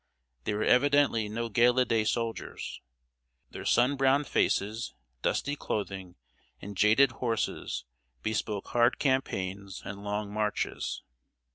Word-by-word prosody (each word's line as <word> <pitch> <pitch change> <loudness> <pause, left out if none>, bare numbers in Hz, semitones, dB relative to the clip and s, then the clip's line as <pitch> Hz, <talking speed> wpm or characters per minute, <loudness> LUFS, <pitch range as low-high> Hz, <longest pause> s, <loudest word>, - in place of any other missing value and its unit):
They 105 - 0
were 105 - 0
evidently 135 -5 +3
no 115 +2 -2
gala 120 +3 +4
day 110 -3 +1
soldiers. 115 0 -3 0.7
Their - - -7
sun 130 +4 +3
browned 135 +2 +3
faces, 110 -1 0 0.3
dusty 145 +1 0
clothing, 95 -8 -4 0.4
and 100 +1 -8
jaded 110 +7 +5
horses 115 - -2 0.4
bespoke 105 -2 -2
hard 120 0 +3
campaigns 100 -8 -1
and 100 0 -7
long 105 0 -3
marches. 105 -1 -2
110 Hz, 115 wpm, -29 LUFS, 105-125 Hz, 0.7 s, jaded